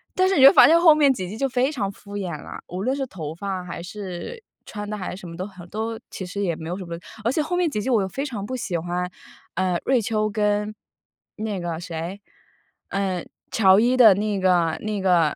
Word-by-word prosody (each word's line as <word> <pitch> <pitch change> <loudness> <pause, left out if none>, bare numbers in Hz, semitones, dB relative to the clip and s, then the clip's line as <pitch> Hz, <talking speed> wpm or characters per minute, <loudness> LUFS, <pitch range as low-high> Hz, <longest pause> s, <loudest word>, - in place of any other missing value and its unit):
但 370 0 +3
是 385 - +2
你 265 - +6
就 275 - +10
发 - - +9
现 330 +2 +6
后 335 -3 +8
面 290 -2 +5
几 185 -7 -5
季， 205 - -6
就 275 +1 0
非 260 +2 +1
常 200 -9 -2
敷 200 +1 -12
衍 185 -4 -3
了， - - -8
无 180 +3 -4
论 260 +4 +1
是 270 -1 -3
头 160 -8 -6
发 190 0 -4
还 170 -1 -7
是 200 - -7 0.2
穿 205 -1 -6
的 210 - -3
还 185 - -4
是 - - -10
什 180 - -9
么 165 - -8
都 185 - -4
很， 185 -3 -12
都 220 +2 -3
其 - - -6
实 190 +3 -5
也 170 -3 0
没 160 +1 -7
有 180 - -3
什 190 - -7
么 170 -1 -5 0.3
而 235 - +2
且 310 - +1
后 320 +4 -1
面 355 -1 +2
几 210 -7 -2
季 260 - -3
我 230 -5 +3
又 - - -2
非 270 +9 -3
常 220 -8 -5
不 255 - -4
喜 200 -8 -2
欢， 175 +2 -2 0.5
呃， 185 -1 +1
瑞 260 -2 +3
秋 215 0 0
跟 210 0 0 0.7
那 215 -3 -2
个 170 -2 -3
谁， 170 +3 -5 0.7
呃， 190 -3 -1 0.3
乔 195 -2 +5
伊 245 +3 +3
的 225 -5 +9
那 205 -1 -1
个 175 -4 +3
那 215 -1 -2
个， 175 -5 +3
200 Hz, 260 characters per minute, -23 LUFS, 180-235 Hz, 0.7 s, 就